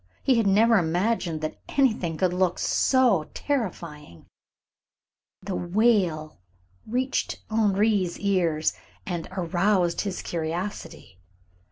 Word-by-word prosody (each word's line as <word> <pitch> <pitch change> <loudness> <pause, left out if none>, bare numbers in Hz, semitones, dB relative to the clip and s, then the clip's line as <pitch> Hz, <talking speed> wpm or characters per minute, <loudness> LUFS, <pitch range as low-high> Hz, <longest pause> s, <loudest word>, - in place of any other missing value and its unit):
He 265 - +3
had 225 -3 +2
never 220 +3 +5
imagined 175 -1 -1
that 155 - -5 0.2
anything 215 - +1
could 185 0 +1
look 180 -1 +1
so 235 - +2
terrifying. 170 - -4 1.2
The 195 0 -4
wail 175 - +1 0.5
reached 255 +4 -1
Henri's 205 -3 +1
ears 175 -6 +1 0.3
and 175 -3 -4
aroused 180 0 +1
his 195 -3 -4
curiosity. 165 - -5
185 Hz, 95 wpm, -25 LUFS, 165-215 Hz, 1.2 s, never